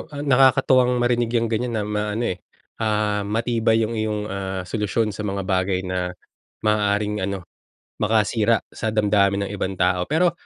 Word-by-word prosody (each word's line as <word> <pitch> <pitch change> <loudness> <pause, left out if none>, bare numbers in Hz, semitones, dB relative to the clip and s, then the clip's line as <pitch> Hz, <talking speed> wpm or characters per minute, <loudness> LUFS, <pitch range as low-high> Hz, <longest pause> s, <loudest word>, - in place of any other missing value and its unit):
ah, 145 -3 -6
nakakatuwang 130 -2 +4
marinig 120 -1 +1
'yang 115 -1 +1
ganiyan 120 +1 -1
na 105 - 0
maano, 105 +2 -2
eh, 90 - -4 0.4
ah, 105 -1 +1
matibay 115 0 +1
'yung 110 +1 -1
iyong, 105 -1 -1
ah, 95 -1 -3
solusyon 105 +3 -1
sa 105 +2 -5
mga 100 0 -2
bagay 95 0 0
na 90 -1 -3 0.5
maaaring 105 -1 +1
ano, 95 -1 -3 0.6
makasira 110 +1 +2
sa 110 - -3
damdamin 100 -2 +2
ng 100 - -6
ibang 95 -1 -3
tao. 90 0 +1
Pero 170 +3 +3
105 Hz, 155 wpm, -22 LUFS, 100-115 Hz, 0.6 s, nakakatuwang